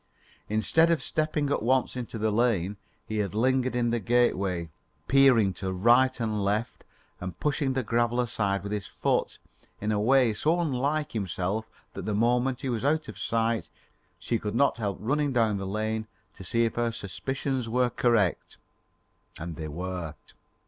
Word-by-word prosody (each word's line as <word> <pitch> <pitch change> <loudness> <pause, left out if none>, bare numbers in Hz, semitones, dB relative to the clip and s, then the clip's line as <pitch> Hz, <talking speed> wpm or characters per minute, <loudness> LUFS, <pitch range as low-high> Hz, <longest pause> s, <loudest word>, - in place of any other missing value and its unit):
Instead 110 - +3
of 165 -2 +3
stepping 155 -2 -1
at - - +1
once 130 +4 +1
into 120 -2 -5
the 110 0 0
lane, 105 -4 +1 0.3
he 110 0 -3
had 100 0 -2
lingered 130 +2 +1
in 120 -1 +1
the 120 - +1
gateway 100 -8 +1 0.4
peering 130 -7 +5
to 95 +2 -4
right 120 +8 +4
and 110 -3 -1
left 105 +4 -1 0.4
and 90 -1 -6
pushing 145 -2 0
the 130 0 -1
gravel 120 +2 +1
aside 100 -5 0
with 100 - -5
his 105 -2 -3
foot - - -1 0.4
in 105 +1 -1
a 105 - +1
way 125 +1 +4
so 160 +10 +1
unlike 150 -1 0
himself 100 +1 -2 0.3
that - - -6
the 105 - -1
moment 125 +3 +1
he 135 - -2
was 120 -1 -2
out 155 +3 +1
of - - -9
sight, 115 0 0 0.5
she 115 - -2
could 105 +1 -4
not 140 +1 +3
help 100 -5 -2
running 145 +6 0
down 115 -5 +2
the 95 -1 -4
lane 110 +2 -2 0.3
to - - -11
see 115 +6 +1
if 115 - -1
her 120 -1 +1
suspicions 130 +4 -3
were 125 +1 +2
correct. 115 -7 +1 0.8
And 85 0 -6
they 80 0 -5
were. 85 0 -5
115 Hz, 170 wpm, -27 LUFS, 100-130 Hz, 0.8 s, peering